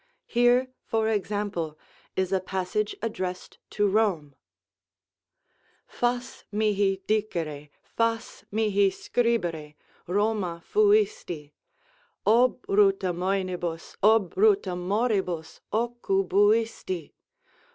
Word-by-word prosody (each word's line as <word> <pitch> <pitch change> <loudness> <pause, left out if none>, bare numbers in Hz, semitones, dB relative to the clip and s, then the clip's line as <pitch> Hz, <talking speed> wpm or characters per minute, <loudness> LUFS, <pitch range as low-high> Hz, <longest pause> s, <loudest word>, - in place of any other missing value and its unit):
Here, 245 +2 +3
for 220 -1 0
example, 200 -7 -2 0.4
is 190 -1 0
a 190 - +2
passage 190 +3 -2
addressed 185 -5 -4
to 205 -1 +1
Rome: 190 -9 +1 1.5
"Fas 245 +1 -2
mihi 205 -2 +1
dicere, 165 -9 -2
fas 230 0 -2
mihi 205 -2 +3
scribere 175 -9 -1 0.3
'Roma 190 -3 0
fuisti,' 410 - +2 0.7
Obruta 205 -5 +3
moenibus, 180 -2 -2
obruta 205 -2 +3
moribus, 190 -3 -1
occubuisti. 205 -4 +1
200 Hz, 75 wpm, -26 LUFS, 180-225 Hz, 1.5 s, Here